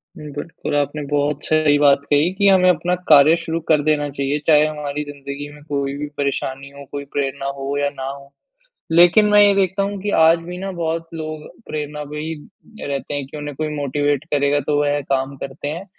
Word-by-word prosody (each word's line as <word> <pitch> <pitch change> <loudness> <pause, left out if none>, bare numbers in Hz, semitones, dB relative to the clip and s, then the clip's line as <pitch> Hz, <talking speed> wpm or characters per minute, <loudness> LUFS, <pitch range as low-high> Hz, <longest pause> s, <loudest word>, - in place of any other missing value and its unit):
उम, 150 -1 -9
बिल्कुल, 145 +1 -5
आपने 145 +1 -1
बहुत 145 0 -1
सही 155 -2 +3
बात 140 -1 +5
कही 150 +5 +3
कि 200 +1 +2
हमें 185 -2 +5
अपना 180 +1 +1 0.2
कार्य 150 +1 +7
शुरू 165 0 -3
कर 150 -2 +4
देना 150 -1 +1
चाहिए। 140 +1 -2
चाहे 150 -1 +6
हमारी 150 -1 -3
ज़िन्दगी 140 0 -7
में 150 0 -15
कोई 140 -1 -1
भी 150 +1 -4
परेशानी 140 -1 -3
हो, 140 0 -12
कोई 140 0 -5
प्रेरणा 135 -1 -2
हो 135 +1 -3
या 145 0 +1
ना 135 -2 -7
हो, 140 0 -10 0.6
लेकिन 175 +5 +6
मैं 210 0 +6
ये 205 -1 +5
देखता 195 0 +1
हूँ 200 0 -3
कि 205 - -1
आज 165 +1 +6
भी 175 +2 -8
ना 195 +1 -4
बहुत 165 0 -2
लोग 155 -1 -6 0.2
प्रेरणा 150 0 -5
पे 150 - -5
ही 160 +1 -4 0.5
रहते 140 +1 -3
है 145 - -2
कि 135 +3 -11
उन्हें 145 -1 -6
कोई 155 0 -2
मोटिवेट 145 0 -1
करेगा 145 0 +2
तो 145 -1 +2
वह 145 0 +1
काम 135 0 0
करते 140 +2 -6
हैं। 170 +5 -5
145 Hz, 205 wpm, -20 LUFS, 140-160 Hz, 0.6 s, कार्य